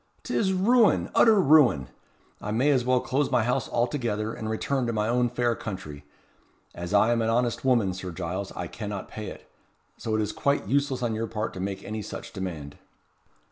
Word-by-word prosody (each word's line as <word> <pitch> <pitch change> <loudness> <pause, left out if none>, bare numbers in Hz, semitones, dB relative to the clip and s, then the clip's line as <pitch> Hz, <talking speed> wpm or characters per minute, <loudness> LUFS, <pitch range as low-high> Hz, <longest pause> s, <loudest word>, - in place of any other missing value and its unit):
'T - - -4
is 190 -3 +2
ruin 220 +5 +3
utter 220 -3 +6
ruin! 135 - +5 0.5
I 105 - -5
may 125 +7 +2
as 130 -3 +2
well 125 0 +2
close 140 +2 0
my 120 - +2
house 125 +2 0
altogether, 115 -3 -1
and 110 - -5
return 125 +3 -1
to 115 - -1
my 105 -1 0
own 120 +1 +2
fair 120 0 +1
country. 85 -10 -7 0.7
As 85 +1 -6
I 105 +3 +4
am 115 -1 +2
an 110 - +1
honest 120 0 0
woman, 120 -8 +2
Sir 90 0 -6
Giles, 90 +2 -4
I 90 - -4
cannot 105 +1 -6
pay 110 -1 -7
it. - - -10 0.5
So 110 - -2
it 110 - +1
is 105 - -3
quite 140 -5 0
useless 135 +1 0
on 115 -2 0
your 115 +1 -2
part 110 -1 -3
to - - -7
make 95 +1 -4
any 110 +1 -4
such - - -8
demand." 80 -7 -6
115 Hz, 200 wpm, -26 LUFS, 100-130 Hz, 0.7 s, utter